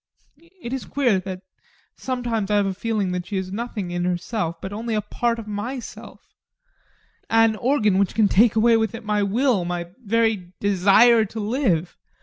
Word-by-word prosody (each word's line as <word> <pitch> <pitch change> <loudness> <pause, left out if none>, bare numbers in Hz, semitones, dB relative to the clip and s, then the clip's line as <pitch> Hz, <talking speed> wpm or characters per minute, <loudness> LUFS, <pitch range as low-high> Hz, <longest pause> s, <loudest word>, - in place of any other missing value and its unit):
It 235 - -5
is 265 - -4
queer 245 -9 +1
that 185 0 -7 0.5
sometimes 240 -5 -3
I 210 - +2
have 205 -1 +3
a 195 - -1
feeling 205 -1 -2
that 180 0 -4
she 205 - -3
is 190 0 -4
nothing 210 -4 -4
in 175 0 -2
herself, 175 -1 -2
but 190 +3 -7
only 225 +1 -3
a 210 - +1
part 235 +3 -1
of 230 - -7
myself 235 +5 -7 1.0
an 225 -1 +4
organ 215 -7 +2
that 200 -2 0
can 220 -2 +4
take 220 +3 +4
away 225 +1 +4
with 225 +1 -1
it 230 - -8
my 210 -1 +1
will, 220 0 +1
my 175 0 -4
very 220 -4 0
desire 205 +4 +5
to 220 +2 -7
live. 205 - 0
210 Hz, 175 wpm, -22 LUFS, 190-230 Hz, 1.0 s, desire